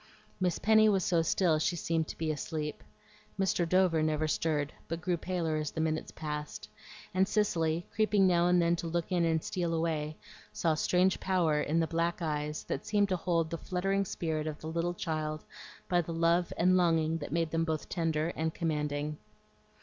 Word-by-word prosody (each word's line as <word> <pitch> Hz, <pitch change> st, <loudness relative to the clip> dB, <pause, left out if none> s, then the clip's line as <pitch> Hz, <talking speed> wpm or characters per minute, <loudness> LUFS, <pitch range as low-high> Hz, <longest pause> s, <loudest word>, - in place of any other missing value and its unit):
Miss 180 Hz, -2 st, +1 dB
Penny 220 Hz, 0 st, +5 dB
was 195 Hz, -3 st, +2 dB
so 170 Hz, -2 st, +3 dB
still 165 Hz, -1 st, +2 dB
she 175 Hz, +3 st, 0 dB
seemed 165 Hz, -1 st, -1 dB
to -, -, -7 dB
be 160 Hz, -1 st, -1 dB
asleep. 150 Hz, 0 st, -4 dB, 0.6 s
Mr. 180 Hz, -3 st, +1 dB
Dover 185 Hz, -3 st, +3 dB
never 155 Hz, 0 st, +1 dB
stirred, 150 Hz, -1 st, 0 dB
but 165 Hz, 0 st, -3 dB
grew 180 Hz, +1 st, 0 dB
paler 170 Hz, -2 st, -2 dB
as 155 Hz, -1 st, -2 dB
the -, -, -6 dB
minutes 160 Hz, 0 st, -1 dB
passed; 150 Hz, -1 st, -5 dB, 0.5 s
and 190 Hz, +1 st, +3 dB
Cicely, 170 Hz, -6 st, +1 dB
creeping 210 Hz, -2 st, +3 dB
now 175 Hz, -1 st, +4 dB
and 180 Hz, 0 st, +4 dB
then 170 Hz, 0 st, +3 dB
to 165 Hz, -, -4 dB
look 170 Hz, +2 st, -2 dB
in 175 Hz, -2 st, +2 dB
and 160 Hz, -1 st, +1 dB
steal 170 Hz, -2 st, -1 dB
away, 155 Hz, -2 st, -1 dB, 0.3 s
saw 165 Hz, -2 st, +1 dB
strange 180 Hz, +4 st, +2 dB
power 170 Hz, -5 st, +1 dB
in 155 Hz, +3 st, +1 dB
the 165 Hz, -, +2 dB
black 170 Hz, +2 st, -1 dB
eyes 150 Hz, -2 st, -2 dB
that 135 Hz, -, -4 dB
seemed 205 Hz, -1 st, +2 dB
to 185 Hz, -, +2 dB
hold 165 Hz, -2 st, 0 dB
the 165 Hz, -, -3 dB
fluttering 195 Hz, +2 st, 0 dB
spirit 160 Hz, -4 st, -3 dB
of 150 Hz, -1 st, -4 dB
the -, -, -10 dB
little 170 Hz, +2 st, -1 dB
child 155 Hz, -2 st, -3 dB, 0.4 s
by 175 Hz, -2 st, +3 dB
the 165 Hz, 0 st, -6 dB
love 170 Hz, +1 st, +2 dB
and 185 Hz, +2 st, +4 dB
longing 165 Hz, -2 st, +2 dB
that 145 Hz, -, -6 dB
made 165 Hz, 0 st, 0 dB
them 165 Hz, 0 st, +1 dB
both 160 Hz, -2 st, -2 dB
tender 165 Hz, -2 st, 0 dB
and 160 Hz, -1 st, -2 dB
commanding. 150 Hz, -2 st, -2 dB
165 Hz, 190 wpm, -31 LUFS, 155-180 Hz, 0.6 s, Penny